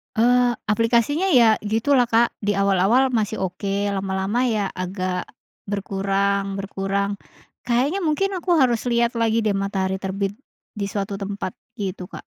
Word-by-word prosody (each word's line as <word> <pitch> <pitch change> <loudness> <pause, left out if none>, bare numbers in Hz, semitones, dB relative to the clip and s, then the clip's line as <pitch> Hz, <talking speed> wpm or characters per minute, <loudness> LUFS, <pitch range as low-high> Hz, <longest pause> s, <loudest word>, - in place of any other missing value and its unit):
Eee, 245 +1 +3 0.2
aplikasinya 235 - +2
ya 225 -3 +5
gitulah 235 +4 +2
Kak 230 0 +2
di 205 -1 0
awal-awal 200 +7 +3
masih 220 -2 0
oke, 200 +2 -2
lama-lama 195 +5 -1
ya 210 -4 0
agak, 185 0 -3 0.4
berkurang 200 0 -1
berkurang, 195 0 -2 0.5
kayaknya 265 +11 +1
mungkin 370 +4 0
aku 350 0 +1
harus 250 -4 +2
lihat 235 0 +2
lagi 225 0 +2
deh 210 - +2
matahari 195 -1 -1
terbit, 195 0 -2 0.4
di 200 -2 -4
suatu 200 0 -4
tempat 200 -1 -4 0.2
gitu 190 -4 -5
Kak. - - -10
205 Hz, 135 wpm, -22 LUFS, 195-235 Hz, 0.5 s, ya